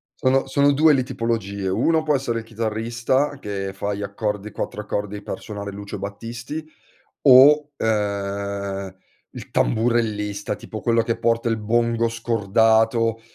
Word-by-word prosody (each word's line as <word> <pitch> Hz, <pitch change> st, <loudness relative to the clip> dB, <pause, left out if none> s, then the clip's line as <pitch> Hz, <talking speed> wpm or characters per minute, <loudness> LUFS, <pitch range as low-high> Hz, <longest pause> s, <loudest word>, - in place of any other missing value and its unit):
Sono 135 Hz, +1 st, +1 dB
sono 140 Hz, +2 st, +3 dB
2 155 Hz, +1 st, +5 dB
le 130 Hz, -2 st, +2 dB
tipologie: 110 Hz, -6 st, -3 dB
1 155 Hz, -, +2 dB
può 150 Hz, -2 st, +2 dB
essere 120 Hz, -4 st, -1 dB
il 110 Hz, -, -10 dB
chitarrista 115 Hz, +5 st, -1 dB
che 100 Hz, -4 st, -4 dB
fa 100 Hz, +1 st, -3 dB
gli 100 Hz, +1 st, -4 dB
accordi 105 Hz, 0 st, -3 dB
4 105 Hz, -, -4 dB
accordi 105 Hz, 0 st, -4 dB
per -, -, -6 dB
suonare 100 Hz, -2 st, -6 dB
Lucio 100 Hz, 0 st, -7 dB
Battisti, 115 Hz, +9 st, -6 dB, 0.6 s
o, 145 Hz, +3 st, +7 dB
ehm, 100 Hz, -2 st, -2 dB, 0.4 s
il -, -, -9 dB
tamburellista, 110 Hz, -3 st, 0 dB
tipo 110 Hz, -, -8 dB
quello 115 Hz, -1 st, +2 dB
che 115 Hz, -, -1 dB
porta 115 Hz, 0 st, +1 dB
il 115 Hz, -1 st, +1 dB
bongo 115 Hz, +1 st, +1 dB
scordato, 115 Hz, 0 st, +2 dB
115 Hz, 140 wpm, -22 LUFS, 100-120 Hz, 0.6 s, o